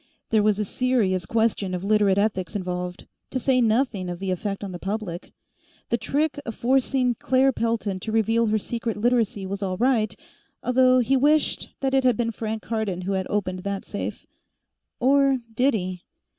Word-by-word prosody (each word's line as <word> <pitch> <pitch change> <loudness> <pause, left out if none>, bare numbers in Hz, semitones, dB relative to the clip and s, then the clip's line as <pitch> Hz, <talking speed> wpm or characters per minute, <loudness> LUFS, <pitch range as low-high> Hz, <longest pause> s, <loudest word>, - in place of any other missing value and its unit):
There 220 -1 +4
was 210 -1 +2
a 210 - -1
serious 200 -7 0
question 220 -4 0
of 180 - -5
Literate 205 -1 +3
ethics 200 -2 0
involved, 180 -2 -4 0.2
to - - -2
say 255 0 +2
nothing 220 -5 +1
of 175 - -4
the 190 +1 -3
effect 195 +2 -3
on 195 - -5
the 175 - -7
public. 195 -3 -4 0.6
The 235 - +2
trick 295 +4 -1
of 230 -4 -6
forcing 255 0 +2
Claire 260 +3 +2
Pelton 230 -5 -1
to 220 - -5
reveal 225 +1 +2
her 215 0 +2
secret 230 +1 -3
Literacy 225 -3 +1
was 200 +1 -4
all 185 -2 -2
right, 230 -2 +2 0.5
although 255 0 +4
he 255 +3 +2
wished 295 +3 +2
that 270 -1 0
it 270 -1 +3
had 250 -4 +3
been 230 -1 0
Frank 220 -1 -4
Cardon 210 -4 -2
who 185 +2 -3
had 190 -1 -1
opened 185 -3 -1
that 200 +1 -4
safe. - - -5 0.7
Or 275 +1 +4 0.2
did 255 +3 +2
he? 185 -3 -4
220 Hz, 180 wpm, -24 LUFS, 195-250 Hz, 0.7 s, There